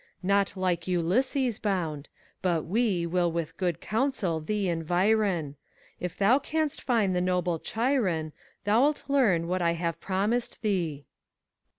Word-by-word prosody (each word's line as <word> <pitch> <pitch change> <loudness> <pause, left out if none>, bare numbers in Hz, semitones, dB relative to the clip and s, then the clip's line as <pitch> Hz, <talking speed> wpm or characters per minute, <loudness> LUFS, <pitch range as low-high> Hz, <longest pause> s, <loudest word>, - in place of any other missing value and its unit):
Not 200 0 +1
like 180 -2 -1
Ulysses 230 - +1
bound, 165 -8 -2 0.2
— - - -35
^but 170 -4 +1
we 195 -2 +1
Will 175 0 +1
witii 165 -1 -3
good 175 -3 -1
counsel 220 - 0
thee 200 +5 -1
environ: 180 +2 +1
^ - - -7
FAUST, - - -18 0.4
If 180 -1 -5
thou 225 +7 +4
canst 310 0 -2
find 215 -7 +1
the 180 - +1
noble 180 -2 0
Chiron, 210 - 0 0.3
Thou 225 +8 +4
It 300 - -5
learn 220 - +3
what 185 +1 -1
I 170 -1 +2
have 170 -1 -3
promised 210 +7 -1
thee. 170 -9 -1
185 Hz, 155 wpm, -28 LUFS, 170-220 Hz, 0.4 s, thou